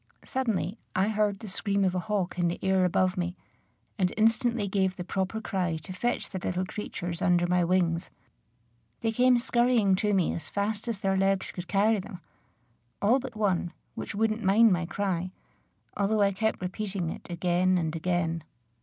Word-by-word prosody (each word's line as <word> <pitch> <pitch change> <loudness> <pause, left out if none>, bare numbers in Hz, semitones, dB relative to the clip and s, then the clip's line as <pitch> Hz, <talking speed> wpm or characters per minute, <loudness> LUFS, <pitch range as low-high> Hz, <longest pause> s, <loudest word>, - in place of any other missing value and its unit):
Suddenly 225 -5 -1 0.2
I 190 +3 +2
heard 210 -2 +1
the 220 - -9
scream 200 0 0
of 185 - +1
a 185 - 0
hawk 190 -2 -2
in 175 - +3
the 170 - -1
air 190 -1 +3
above 185 +1 +1
me, 175 0 -2 0.6
and 180 -1 +2
instantly 225 0 +2
gave 190 -1 +1
the 180 - -5
proper 190 +4 -2
cry 180 -6 -1
to 160 +4 -8
fetch 240 +7 -2
the 190 - -3
little 180 +1 -2
creatures 175 -3 -5
under 175 -2 +3
my 180 0 +2
wings. 170 -1 +1 0.9
They 225 - +1
came 250 +2 +4
scurrying 240 -4 +3
to 210 +1 +1
me 185 -3 +2
as 160 - -6
fast 210 +2 -2
as 230 -3 -1
their 195 -1 0
legs 195 0 +1
could 180 -1 -7
carry 210 +3 +3
them, 190 -1 -8 0.8
all 230 +6 +4
but 255 -3 -7
one, 190 -5 0 0.2
which - - -6
wouldn't 220 +1 +1
mind 205 +2 +5
my 175 -1 -1
cry, 185 -2 -1 0.7
although 210 +1 +1
I 200 - +3
kept 220 +2 -1
repeating 185 -2 -3
it - - -9
again 180 +1 +2
and 160 -2 -1
again. 165 -1 -1
190 Hz, 180 wpm, -28 LUFS, 180-215 Hz, 0.9 s, mind